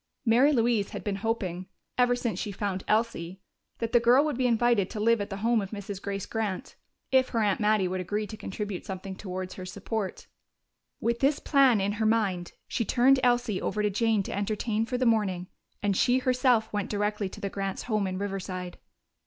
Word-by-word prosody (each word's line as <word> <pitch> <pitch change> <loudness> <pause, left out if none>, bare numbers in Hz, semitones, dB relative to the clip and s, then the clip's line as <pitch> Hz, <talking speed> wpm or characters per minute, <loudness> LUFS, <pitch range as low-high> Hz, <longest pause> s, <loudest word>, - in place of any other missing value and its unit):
Mary 245 +6 +5
Louise 230 -6 +2
had - - -7
been 200 -2 -2
hoping, 195 -4 -2 0.3
ever 245 0 +3
since 235 -6 -2
she 205 - -3
found 190 -1 -3
Elsie, 195 -5 0 0.4
that 230 -1 -3
the 240 - +6
girl 245 +5 +5
would 300 - -1
be 255 0 +1
invited 235 -4 +2
to 215 - -5
live 230 0 +3
at 205 - -4
the 195 - -4
home 235 -2 +3
of 195 - -5
Mrs. 200 -2 -6
Grace 200 -1 -3
Grant 220 +2 -3 0.4
if 260 -1 +4
her 230 - -1
aunt 205 -3 +2
Mattie 210 -3 +3
would 185 0 -2
agree 210 +4 -2
to 215 - -8
contribute 205 -2 -5
something 190 0 -6
towards 185 -1 -5
her 185 - -8
support. 200 +1 -4 0.7
With 235 +1 0
this 280 +2 +3
plan 270 -6 +4
in 195 +1 0
her 215 +1 0
mind, 195 -6 0
she 230 - -1
turned 260 +5 +4
Elsie 240 -5 +2
over 210 - -1
to 210 - +2
Jane 220 0 +2
to - - -5
entertain 215 +2 -1
for 250 0 -1
the 255 - 0
morning, 200 -6 +1 0.3
and 200 -1 +2
she 250 +6 +3
herself 250 -3 +2
went 205 -2 -2
directly 210 -1 -1
to - - -10
the 200 - -3
Grants' 195 -1 -3
home 215 -4 0
in 185 0 -3
Riverside. 185 -2 -4
210 Hz, 200 wpm, -28 LUFS, 195-235 Hz, 0.7 s, the